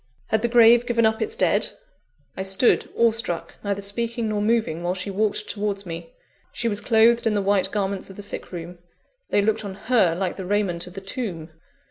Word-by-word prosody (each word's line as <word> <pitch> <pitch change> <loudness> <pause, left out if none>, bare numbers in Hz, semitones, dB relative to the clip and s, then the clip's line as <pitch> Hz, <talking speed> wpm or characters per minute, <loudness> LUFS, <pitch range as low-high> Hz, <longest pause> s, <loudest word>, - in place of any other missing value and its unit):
Had 220 - +2
the 240 - +1
grave 235 0 +6
given 230 -2 +2
up 220 +1 +1
its 440 +1 -2
dead? - - +1 0.6
I - - -4
stood 190 +5 +2
awe 230 -1 +5
struck, 220 -7 -4
neither 200 -1 -2
speaking 230 +3 -2
nor 210 -1 -1
moving 215 -7 +1
while 175 +1 -1
she 190 +2 -4
walked 210 +1 0
towards 205 -1 -3
me. 165 - -7 0.4
She 235 - -2
was 205 -2 -1
clothed 230 0 +4
in 215 - +1
the - - +2
white 200 -1 +2
garments 200 -2 -2
of 190 - -11
the 205 - -7
sick 200 - -5
room 175 0 -7 0.5
they 205 - +2
looked 220 +1 +1
on 195 -2 -6
her 200 -5 +2
like 185 0 -2
the 190 - -5
raiment 185 -4 -1
of 180 - -11
the 195 - -7
tomb. 190 - -5
205 Hz, 205 wpm, -24 LUFS, 190-230 Hz, 0.6 s, grave